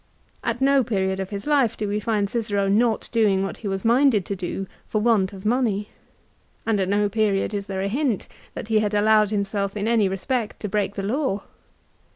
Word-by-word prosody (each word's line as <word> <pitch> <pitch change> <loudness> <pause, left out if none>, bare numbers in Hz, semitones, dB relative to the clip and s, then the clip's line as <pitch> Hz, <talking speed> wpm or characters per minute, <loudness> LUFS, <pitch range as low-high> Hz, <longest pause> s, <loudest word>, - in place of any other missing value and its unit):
At 255 - -2
no 275 0 +4
period 190 -4 -1
of 190 -1 -3
his 200 -1 -6
life 275 -7 +2
do 210 - -2
we 205 +1 -1
find 210 -2 0
Cicero 205 -3 -1
not 220 +3 +2
doing 210 -5 +3
what 195 - -4
he 215 - -6
was 195 +1 -3
minded 235 -4 +4
to 200 - -3
do 185 +1 -4 0.2
for 215 - 0
want 210 -4 +2
of 195 0 -11
money, 215 -3 +1 0.8
and 225 -2 +1
at 190 -1 0
no 205 +1 +2
period 205 -1 0
is 200 -1 -3
there 190 -1 -3
a - - 0
hint 250 -1 -1 0.3
that - - -6
he 220 -1 +4
had 210 -1 0
allowed 215 0 +4
himself 200 -1 -2
in 205 +1 -1
any 225 -4 +3
respect 220 +4 -2
to 210 - -2
break 200 -1 -1
the 195 - -3
law. 215 -2 -1
210 Hz, 205 wpm, -23 LUFS, 195-225 Hz, 0.8 s, no